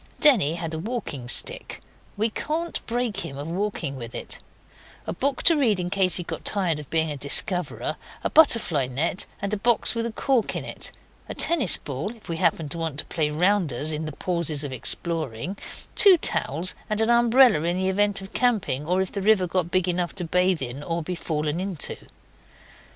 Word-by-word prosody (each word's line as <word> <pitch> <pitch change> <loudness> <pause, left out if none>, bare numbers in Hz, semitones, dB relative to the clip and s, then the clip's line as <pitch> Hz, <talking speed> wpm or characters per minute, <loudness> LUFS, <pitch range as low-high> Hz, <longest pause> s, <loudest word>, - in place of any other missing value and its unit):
Denny 205 - +5
had 165 -1 -5
a 160 - -3
walking 170 - -5
stick 120 - +3 0.4
we 220 +2 +1
can't 330 +8 -3
break 235 -3 -1
him 135 -8 -5
of 145 +2 -6
walking 180 -5 -3
with 115 -2 -7
it - - -5 0.7
a - - -3
book 270 +8 -1
to 335 - +5
read 235 -10 +2
in 180 0 -3
case 190 -2 +4
he 175 - +1
got - - -6
tired 180 -7 +1
of 150 - -10
being 160 -1 +1
a 145 - -5
discoverer, 165 +4 +1 0.3
a - - 0
butterfly 215 - +4
net 150 +8 -2 0.2
and 200 +1 -2
a - - +1
box 230 +2 +3
with 230 0 -1
a - - -5
cork 250 0 0
in - - -4
it, - - -6 0.4
a - - -5
tennis 300 - +4
ball, 150 - -5
if 225 - -18
we 165 - -2
happened 165 -4 0
to 170 - -3
want 160 -4 -3
to - - -3
play 155 -3 -1
rounders 155 -4 0
in 155 +1 -3
the 155 - -4
pauses 165 -3 -1
of 140 -2 -4
exploring, 160 - -3 0.4
two 390 -3 +7
towels 170 - +1 0.2
and 215 0 -1
an 225 +1 +2
umbrella 235 - +5
in 175 +1 0
the 190 0 0
event 200 +1 +1
of 195 - -11
camping 205 - 0
or 185 +2 +2
if 190 - -7
the 200 - -4
river 205 -2 +4
got 180 -1 -1
big 185 0 +1
enough 175 -1 -1
to 185 - -4
bathe 180 -1 +1
in 130 +3 -6
or 165 +2 -3
to - - -10
be 180 - -3
fallen 155 -2 -2
into. 185 -4 -2
180 Hz, 205 wpm, -24 LUFS, 155-215 Hz, 0.7 s, two